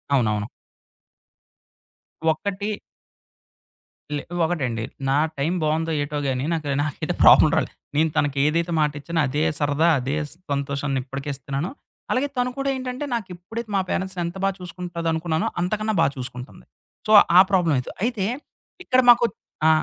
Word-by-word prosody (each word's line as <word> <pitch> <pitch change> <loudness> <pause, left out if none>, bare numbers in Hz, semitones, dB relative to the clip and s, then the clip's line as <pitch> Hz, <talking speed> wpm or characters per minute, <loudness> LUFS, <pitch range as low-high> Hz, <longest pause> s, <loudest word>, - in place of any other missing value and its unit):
అవునవును. 105 -4 +1 1.8
ఒకటి 200 +5 -1 1.5
లే, - - -3 0.2
ఒకటండి. 130 -10 -1 0.3
నా 140 - +3 0.2
టైం 150 +5 0
బావుందో 160 +2 0
ఏటో 145 +1 -4
గాని 130 +1 -1
నాకు, 155 -3 -3 0.2
నాకైతే 150 -3 -3
ప్రాబ్లమ్ - - +8
రాలేదు. - - 0 0.2
నేను 160 +1 +3
తనకేదైతే 150 +4 +1
మాటిచ్చానో 150 +2 0
అదే 145 +4 0 0.2
సరదా, 145 +3 +2
అదే 135 +3 -2 0.4
సంతోషాన్ని 140 -1 -1
ఇప్పటికీ 135 +2 -6
ఇస్తున్నాను. 140 +5 -4 0.4
అలాగే 260 +3 +1
తను 250 0 +1
కూడా 275 0 -1
ఏంటంటే 255 +2 -4
నాకెప్పుడైతే 210 +2 -6
మా 195 - +3
పేరెంట్స్‌ని 185 -1 -2
ఎంత 170 +3 -5
బాగా 195 -1 +1
చూసుకుంటదనుకున్నానో 170 -2 -2
అంతకన్నా 215 +4 0
బాగా 140 - +3
చూసుకుంటుంది. 125 - -8 0.4
సో, - - +1 0.3
ఆ - - +11
ప్రాబ్లమ్ 175 -6 +3
అయిత 125 - -3
అయితే, 230 -5 0 0.6
ఇక్కడ 255 0 +3
మాకొ 240 0 +7 0.4
ఆ! - - +7
160 Hz, 130 wpm, -23 LUFS, 140-190 Hz, 1.8 s, ఆ